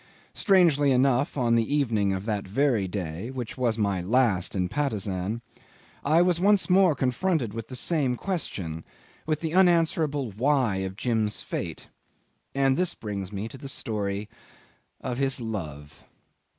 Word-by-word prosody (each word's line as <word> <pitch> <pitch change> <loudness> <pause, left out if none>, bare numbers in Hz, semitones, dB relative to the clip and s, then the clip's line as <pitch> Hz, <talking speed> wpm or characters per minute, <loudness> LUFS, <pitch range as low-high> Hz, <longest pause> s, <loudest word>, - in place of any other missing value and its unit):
Strangely 165 -8 +4
enough, 130 +2 +2
on 120 -3 +2
the 115 +5 +2
evening 110 -9 +1
of 95 +1 -3
that 105 -3 -2
very 115 -2 +1
day 90 +2 -4
(which 125 -3 -5
was 120 -3 0
my 100 -4 0
last 105 -2 +1
in 90 -2 0
Patusan) 105 -4 -2 0.6
I 160 +4 +4
was 175 -2 +2
once 200 0 +3
more 185 -4 +5
confronted 130 - 0
with 115 -1 -6
the 130 - -7
same 135 -1 +1
question, 95 - -3 0.4
with 155 -1 0
the 160 -1 -2
unanswerable 165 - +2
why 125 -1 +1
of 95 0 -3
Jim's 110 -2 -1
fate. - - -5 0.7
And 135 -1 +3
this 180 -1 0
brings 100 -3 -5
me 100 +2 -4
to 135 - -10
the 135 - -5
story 105 -4 -2 0.7
of 125 -1 -3
his 135 -1 +1
love. 80 - -6
120 Hz, 150 wpm, -26 LUFS, 100-145 Hz, 0.7 s, more